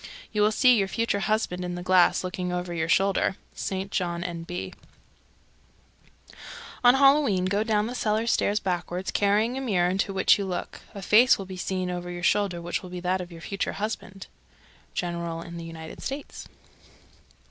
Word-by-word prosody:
You 210 - 0
will 210 +1 +4
see 250 +2 +5
your 195 - +1
future 230 0 -1
husband 200 -3 -1
in 180 0 -4
the 175 - -6
glass, 185 0 +4
looking 180 0 -3
over 180 0 -3
your 165 -1 -2
shoulder. 195 +1 +2 0.2
St. 195 +1 -4
John, 175 -2 -1
N.B. 175 0 -5 1.6
313. - - -19 0.4
On 245 +1 +7
Halloween 275 -9 +4
go 200 +3 +1
down 215 -1 +1
the 240 - -4
cellar 220 -2 0
stairs 210 -2 +1
backward, 180 -1 -3
carrying 215 +5 +2
a - - -4
mirror 180 -8 +1
into 195 +1 0
which 195 +1 +4
you 200 - -2
look. 185 -2 -5
A 200 - -7
face 235 +7 +6
will 195 - -6
be 190 0 -8
seen 185 0 -2
over 175 0 -5
your 175 0 -6
shoulder 185 -3 +1
which 175 - -2
will 185 - -10
be 180 0 -6
that 180 +1 0
of 175 0 -8
your 165 -1 -10
future 195 +3 -3
husband. 200 -2 -5 0.7
_General 170 -1 -3
in 170 0 -8
the 170 - -7
United 160 -1 -9
States. 275 +1 -6
185 Hz, 180 wpm, -26 LUFS, 175-210 Hz, 1.6 s, On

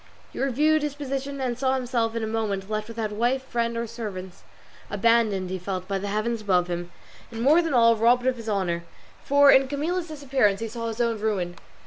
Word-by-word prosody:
He - - -5
reviewed 300 +4 +2
his 295 -1 -3
position, 275 -1 -4
and 250 -2 -1
saw 265 0 +2
himself 240 -3 -1
in 230 - -2
a - - 0
moment 215 -3 -2
left 215 0 -2
without 225 -2 -4
wife, 240 +5 0
friend, 235 -2 -2
or 235 - -1
servants, 205 -6 -7 0.5
abandoned, 205 -3 +2
he 185 - -3
felt, 185 0 -4
by 195 -1 -1
the 200 - -4
heaven 215 +3 -1
above 185 -4 +2
him, 175 0 -4 0.4
and 225 - -8
more 295 +8 +5
than 325 -5 -1
all 230 -1 +6
robbed 240 +3 +3
of 260 -1 +2
his 230 -1 -6
honour, 180 -4 -1 0.4
for 285 0 +6
in 265 0 +5
Camilla's 330 +6 -2
disappearance 270 -9 +1
he 225 - -3
saw 230 +1 -5
his 225 +1 -5
own 230 -2 0
ruin. 190 -5 -1
230 Hz, 205 wpm, -25 LUFS, 205-265 Hz, 0.5 s, all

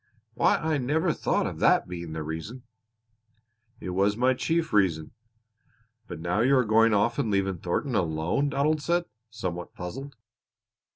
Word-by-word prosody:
"Why, - - +3
I 155 -2 -1
never 155 +6 +1
thought - - 0
of - - -5
that - - +3
being 85 -2 -6
the 80 -1 -4
reason!" 80 +11 -6 1.2
"It 90 - -5
was 100 +3 +1
my 130 +2 +3
chief 165 +5 -1
reason." 85 -7 +2 1.0
"But - - -7
now 85 +4 -1
you 130 +4 +4
are 125 - +3
going 110 0 +4
off 115 +6 +1
and 125 -6 0
leaving 95 -3 0
Thornton 120 - -2
alone," 85 - 0
Donald 150 +2 +1
said, 170 +3 0 0.2
somewhat 90 -5 -5
puzzled. 135 +10 -7
110 Hz, 155 wpm, -27 LUFS, 90-140 Hz, 1.2 s, you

